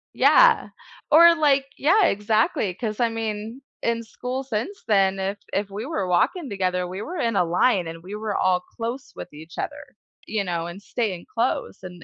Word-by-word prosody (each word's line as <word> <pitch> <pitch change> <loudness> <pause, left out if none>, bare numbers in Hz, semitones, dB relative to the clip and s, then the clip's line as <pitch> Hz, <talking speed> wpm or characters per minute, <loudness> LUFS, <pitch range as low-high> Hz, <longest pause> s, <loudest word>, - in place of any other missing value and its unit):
Yeah. - - +5 0.4
Or 335 +2 +8
like 280 -3 +3
Yeah, 370 +7 +4
exactly, 210 -2 +1
'cause 215 +3 -4
I 235 -1 +3
mean, 225 +2 -4 0.2
in 230 0 -1
school 250 +4 -5
since 265 - -4
then, 195 -2 +3
if 195 +2 -2 0.2
if 200 0 -1
we 210 +5 -5
were 200 - -2
walking 275 - +1
together, 185 -2 -1
we 185 +3 -6
were 350 +9 -6
in 230 -7 0
a 180 - +4
line, 180 +1 +2
and 165 0 -8
we 200 +3 -7
were 215 -1 -3
all 185 -1 +2
close 235 +7 -6
with - - -8
each 160 +3 -12
other, - - -6 0.3
you 215 -2 -1
know, 170 -2 -3
and 180 +4 -9
staying 205 -7 -3
close 235 -4 -1
and 180 -2 -10
210 Hz, 185 wpm, -24 LUFS, 185-250 Hz, 0.4 s, Or